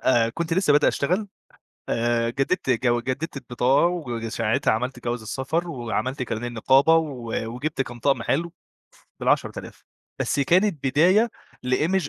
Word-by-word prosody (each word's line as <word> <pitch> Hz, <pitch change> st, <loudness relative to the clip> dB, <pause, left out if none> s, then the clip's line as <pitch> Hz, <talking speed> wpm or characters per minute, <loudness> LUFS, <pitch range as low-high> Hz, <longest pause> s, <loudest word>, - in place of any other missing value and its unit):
آآ 115 Hz, -3 st, +3 dB
كنت 165 Hz, +5 st, -3 dB
لسه 185 Hz, -5 st, +3 dB
بادئ 145 Hz, 0 st, +5 dB
اشتغل، 185 Hz, +8 st, 0 dB, 0.6 s
آآ 115 Hz, 0 st, +1 dB
جددت 135 Hz, +2 st, -1 dB
جو 120 Hz, 0 st, +2 dB
جددت 140 Hz, +6 st, -4 dB
البطاقة 130 Hz, +4 st, +2 dB
وج 125 Hz, -10 st, -3 dB
ساعتها 110 Hz, -1 st, 0 dB
عملت 125 Hz, +2 st, -3 dB
جواز 120 Hz, -1 st, -2 dB
السفر 140 Hz, +9 st, -2 dB
وعملت 125 Hz, -1 st, -3 dB
كارنيه 115 Hz, -1 st, -3 dB
النقابة 135 Hz, +7 st, +4 dB
و 130 Hz, -8 st, -3 dB, 0.2 s
وجِبت 135 Hz, +1 st, -2 dB
كام 120 Hz, -2 st, -9 dB
طقم 135 Hz, 0 st, +1 dB
حلو 165 Hz, +8 st, -1 dB, 0.7 s
بال10000 -, -, -1 dB, 0.4 s
بس 140 Hz, -, 0 dB
كانت 175 Hz, +1 st, +2 dB
بداية 185 Hz, -, +4 dB, 0.4 s
لimage 155 Hz, +6 st, +1 dB
135 Hz, 140 wpm, -24 LUFS, 120-165 Hz, 0.7 s, بادئ